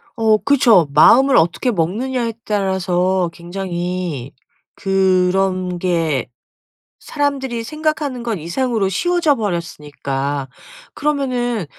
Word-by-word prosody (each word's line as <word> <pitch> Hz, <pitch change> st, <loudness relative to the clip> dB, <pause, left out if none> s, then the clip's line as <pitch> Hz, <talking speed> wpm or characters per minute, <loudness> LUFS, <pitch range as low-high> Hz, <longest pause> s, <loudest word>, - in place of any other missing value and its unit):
어 220 Hz, -3 st, +3 dB
그쵸. 230 Hz, -, +4 dB
마음을 265 Hz, -, +6 dB
어떻게 170 Hz, +9 st, +2 dB
먹느냐에 230 Hz, +7 st, -1 dB
따라서 190 Hz, -3 st, 0 dB
굉장히 175 Hz, -5 st, -4 dB, 0.4 s
그런 185 Hz, -1 st, +1 dB
게 165 Hz, -8 st, -1 dB, 0.7 s
사람들이 270 Hz, -5 st, -2 dB
생각하는 305 Hz, -2 st, -2 dB
것 230 Hz, -2 st, -2 dB
이상으로 200 Hz, +5 st, -1 dB
쉬워져 345 Hz, -, +1 dB
버렸으니까. 145 Hz, -, -4 dB, 0.4 s
그러면은 255 Hz, -, -1 dB
195 Hz, 240 characters per minute, -18 LUFS, 175-250 Hz, 0.7 s, 마음을